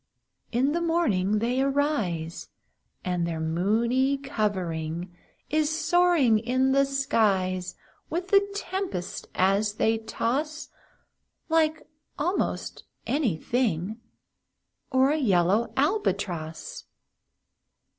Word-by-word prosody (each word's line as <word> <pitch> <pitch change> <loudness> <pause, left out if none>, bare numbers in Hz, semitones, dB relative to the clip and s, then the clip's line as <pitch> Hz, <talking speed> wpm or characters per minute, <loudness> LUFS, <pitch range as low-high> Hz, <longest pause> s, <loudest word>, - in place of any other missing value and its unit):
In 255 +4 +2
the 340 +2 0
morning 220 - +1
they 240 +4 0
arise, 250 - -1 0.6
And 180 -2 0
their 165 -1 -3
moony 225 +12 +1
covering 180 - -3 0.4
Is 305 -1 +2
soaring 320 -7 +3
in 255 +4 +1
the 275 +1 +4
skies, 195 -9 0 0.3
With 355 +3 -3
the 395 0 +6
tempests 375 - -4
as 200 +3 +2
they 225 +1 +2
toss, 275 +7 -2 0.8
Like 315 -1 +2 0.3
almost 350 +6 -2 0.2
any 265 - 0
thing 220 0 -1 0.9
Or 260 +1 +4
a 305 - +1
yellow 210 - +2
Albatross. 200 - -1
235 Hz, 95 wpm, -26 LUFS, 185-295 Hz, 0.9 s, the